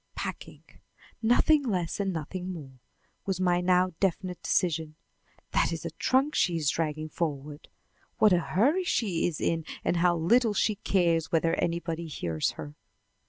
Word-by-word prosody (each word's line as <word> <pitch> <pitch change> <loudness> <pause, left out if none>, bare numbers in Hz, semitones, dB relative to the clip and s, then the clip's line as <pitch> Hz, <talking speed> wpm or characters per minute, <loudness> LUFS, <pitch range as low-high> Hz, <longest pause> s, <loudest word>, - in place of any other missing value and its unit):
"Packing! - - -6 0.6
Nothing 245 +7 +4
less 185 - -2
and 195 -1 0
nothing 180 +3 -5
more," 135 -7 -9 0.5
was 190 -2 -1
my 180 -1 +2
now 180 0 +3
definite 185 -1 -1
decision. 160 -3 0 0.6
"That - - +2
is - - -5
a - - -3
trunk 270 +4 +1
she 175 -2 +2
is 150 -4 +1
dragging 155 -1 -2
forward. 150 -2 -4 0.5
What 215 -3 +5
a 175 - +4
hurry 260 - +1
she 205 - 0
is 165 -4 -4
in, 165 -1 0 0.2
and 175 - +1
how 175 0 +3
little 220 +6 +3
she 215 - +2
cares 170 -5 +1
whether 165 0 +2
anybody 170 -1 -2
hears 80 - -2
her!" 75 -1 -8
175 Hz, 155 wpm, -28 LUFS, 160-195 Hz, 0.6 s, What